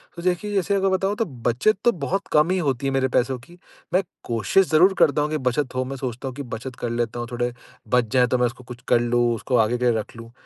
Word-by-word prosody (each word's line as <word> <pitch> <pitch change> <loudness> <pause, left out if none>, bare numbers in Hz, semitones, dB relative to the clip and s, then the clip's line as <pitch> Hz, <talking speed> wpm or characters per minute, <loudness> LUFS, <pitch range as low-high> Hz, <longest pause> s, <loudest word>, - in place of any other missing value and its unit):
तो 170 - -7
देखिए 180 +3 -1
जैसे 200 0 +1
अगर 195 0 +2
बताऊँ 195 +2 0
तो 225 - 0 0.2
बचत 185 - +2
तो 240 - +6
बहुत 180 +2 -3
कम 150 +3 +4
ही 190 - +1
होती 140 -6 -1
है - - 0
मेरे 135 -1 +2
पैसों 130 0 0
की, 170 +9 -17 0.4
मैं 185 - +3 0.2
कोशिश 120 - +2
ज़रूर 180 +5 +5
करता 150 -3 +4
हूँ 150 - 0
कि 155 - -1
बचत 130 0 -1
हो 130 - +1
मैं 135 +2 -5
सोचता 130 0 -5
हूँ 130 - -6
कि 140 - -5
बचत 125 +3 -6
कर 120 - -2
लेता 120 0 -2
हूँ 120 - -4
थोड़े 120 0 -1 0.4
बच 120 -3 +2
जाएँ 125 -1 +4
तो 125 - +1
मैं 125 - +2
उसको 125 +1 -5
कुछ 125 0 -9
कर 120 - +4
लूँ 120 0 +2
उसको 125 +3 -2
आगे 115 +2 +2
के 125 - -4
लिए 120 - +4
रख 105 - -8
लूँ, 115 0 -11
130 Hz, 270 wpm, -23 LUFS, 120-175 Hz, 0.4 s, तो